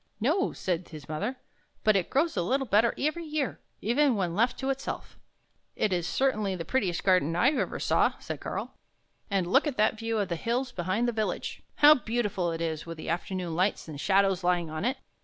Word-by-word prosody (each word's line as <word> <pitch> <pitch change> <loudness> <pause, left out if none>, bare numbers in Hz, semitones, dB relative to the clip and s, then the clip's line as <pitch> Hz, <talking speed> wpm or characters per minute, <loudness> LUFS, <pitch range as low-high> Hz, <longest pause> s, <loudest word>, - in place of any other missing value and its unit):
" - - -46
" - - -44
No," 380 +5 +1
said 180 -1 -3
his 150 -4 -10
mother, 200 +12 -2 0.2
" - - -40
but 215 -1 +4
it 190 -3 +1
grows 310 +4 +1
a 180 - +1
little 265 +10 0
better 220 +1 +3
every 310 +4 -1
year, 305 -4 -2 0.2
even 255 +4 +3
when 180 -4 -1
left 230 +7 +1
to 270 0 -1
itself." 270 0 -5 0.3
" - - -45
It 205 - +1
is 175 -1 0
certainly 215 -7 +1
the 165 -2 -5
prettiest 195 -10 0
garden 180 -4 +3
I 235 +9 +4
ever 305 - -2
saw," - - +2
said - - -6
Karl. - - -4 0.3
" - - -41
And 195 -3 +1
look 270 - +3
at 285 - -3
that 215 +1 +2
view 225 0 -1
of 200 -3 0
the 170 - -1
hills 245 +7 -1
behind 185 +5 -1
the - - +2
village! 220 -2 -3
How 295 +1 +8
beautiful 215 - -1
it 165 0 -4
is 160 -2 -2
with 165 -1 -6
the 155 - -6
afternoon 175 0 -2
lights 185 +1 0
and 150 -2 -7
shadows 195 -2 +3
lying 175 -2 +1
on 155 +4 -3
it! 260 +2 0
200 Hz, 225 wpm, -28 LUFS, 175-250 Hz, 0.3 s, How